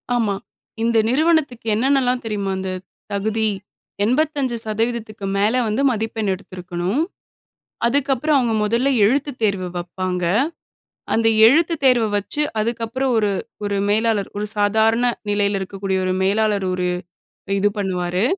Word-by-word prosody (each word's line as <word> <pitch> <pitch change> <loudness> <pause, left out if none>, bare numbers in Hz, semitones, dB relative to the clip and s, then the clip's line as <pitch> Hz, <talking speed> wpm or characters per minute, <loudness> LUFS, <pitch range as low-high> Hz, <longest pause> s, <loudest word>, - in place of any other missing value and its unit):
ஆமா. 220 -4 +1 0.5
இந்த 230 0 +2
நிறுவனத்துக்கு 285 -4 +1
என்னென்னலாம் 255 +1 +2
தெரியுமா 205 -3 -2
இந்த 190 0 -3 0.4
தகுதி 220 +2 0 0.6
85%க்கு 235 -5 -1
மேல 210 +5 +2
வந்து 215 +6 0
மதிப்பெண் 220 -2 -2
எடுத்திருக்கணும். 185 - -3 0.8
அதுக்கப்புறம் 280 +3 +2
அவங்க 240 -3 +1
முதல்ல 235 +6 +1 0.2
எழுத்துத் 275 +3 0
தேர்வு 195 -4 0
வப்பாங்க, 180 +1 -3 0.9
அந்த 225 0 +2 0.2
எழுத்துத் 325 +4 +3
தேர்வ 250 -4 +5
வச்சு 210 +9 -3 0.2
அதுக்கப்புறம் 235 +4 -1
ஒரு 210 -2 +2 0.3
ஒரு 200 -1 -1
மேலாளர், 215 -1 +1
ஒரு 210 - -2
சாதாரண 220 +3 +3 0.2
நிலையில 205 -1 +1
இருக்கக்கூடிய 190 0 -3
ஒரு 185 - 0
மேலாளர், 205 0 +1
ஒரு 180 0 -1 0.7
இது 205 +1 +3
பண்ணுவாரு. 180 0 -1
220 Hz, 115 wpm, -21 LUFS, 200-245 Hz, 0.9 s, தேர்வ